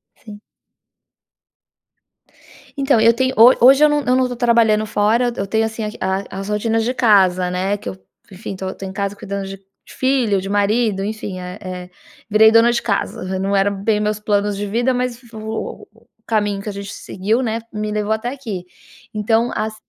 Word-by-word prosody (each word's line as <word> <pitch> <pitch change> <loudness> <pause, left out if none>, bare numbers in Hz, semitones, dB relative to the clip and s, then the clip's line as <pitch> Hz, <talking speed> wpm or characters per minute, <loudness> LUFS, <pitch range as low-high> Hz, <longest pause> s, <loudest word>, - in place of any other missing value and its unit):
Sim. 210 -2 -13 2.4
Então, 270 -5 +3
eu 230 +1 +6
tenho 260 +2 0
ho 235 +3 +9
hoje 270 +4 +7
eu - - +6
não 295 -2 0
eu 250 - +2
não 255 -1 +2
tô 245 - -6
trabalhando 230 -3 +3
fora. 220 +4 +2
Eu - - -8
eu - - -4
tenho, 220 +2 +1
assim, 220 0 -4
a - - -2 0.4
a 190 - -7
as 195 +1 -5
rotinas 225 +2 0
de 250 +2 -1
casa, 185 -6 +3
né, 190 +3 -1
que 200 - -8
eu, 95 -1 -7 0.3
enfim, 195 +1 -7
tô 190 0 -5
tô 195 - -9
em 190 - -6
casa 200 +1 -3
cuidando 195 0 -5
de 195 0 -8 0.3
filho, 250 -7 0
de 195 - -6
marido, 205 0 +1
enfim. 205 -3 -5
Eh 180 +2 -7
eh, 180 -2 -7 0.4
virei 220 +1 +6
dona 230 +1 +6
de 240 - 0
casa. 190 -3 -2
Não 195 +1 0
era 195 +1 +3
bem 205 +2 0
meus 210 0 -1
planos 205 -1 0
de 205 - -3
vida 240 +5 0
mas 250 -1 -2
o 220 0 -6
o 225 +2 -26
o 225 - -43
caminho 205 -3 0
que 210 - -7
a - - -3
gente 200 0 -7
seguiu, 215 +7 -2
né, 225 -1 -1
me 210 0 -3
levou 210 0 -1
até 220 +2 -2
aqui. 220 -10 -6 0.5
Então 225 +2 +1
as 215 0 -2
215 Hz, 200 wpm, -19 LUFS, 200-230 Hz, 2.4 s, ho